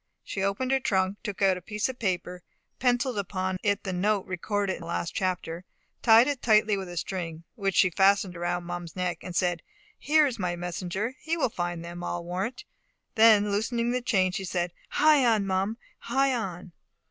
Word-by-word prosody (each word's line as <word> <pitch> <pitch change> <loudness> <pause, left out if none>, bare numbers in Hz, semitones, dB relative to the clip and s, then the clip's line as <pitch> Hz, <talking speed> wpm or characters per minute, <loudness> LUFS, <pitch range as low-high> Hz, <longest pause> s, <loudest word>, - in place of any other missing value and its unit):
She 195 - -4
opened 200 +7 0
her 270 - +3
trunk, 190 -4 0
took 205 -3 -4
out 190 -1 +4
a - - -9
piece 210 +3 -2
of 260 -1 -7
paper, 180 -3 -2 0.4
pencilled 245 -2 +1
upon 185 -1 -2
it 205 -1 0
the 190 - -3
note 200 +2 +1
recorded 195 +2 -2
in - - -7
the 165 - -8
last 170 0 -3
chapter, 180 -2 -2 0.4
tied 225 0 +7
it 285 -3 -2
tightly 215 -2 +4
with 190 -2 -5
a 175 - -8
string, 165 -2 -4
which 195 -5 -2
she 185 - +5
fastened 195 0 +3
around 175 +1 -2
Mum's 175 -1 -6
neck, 180 -2 -2
and 180 - -7
said, 175 -2 +1 0.4
"Here 305 +1 +4
is 250 -6 -3
my 180 -2 -1
messenger! 180 +6 -3
He 330 +1 -2
will 275 -6 +1
find 175 -4 -4
them, 175 +1 -7
I 175 - -2
warrant." 180 +8 -4 0.5
Then 220 -3 +6
loosening 235 +3 0
the 250 0 0
chain, 190 -7 +2
she 195 - -4
said, 175 -1 -2 0.2
"Hie 300 -2 +4
on, 220 -4 +3
Mum! 195 +3 -1 0.2
hie 270 +3 +1
on!" 185 -6 -4
195 Hz, 195 wpm, -27 LUFS, 180-225 Hz, 0.5 s, tied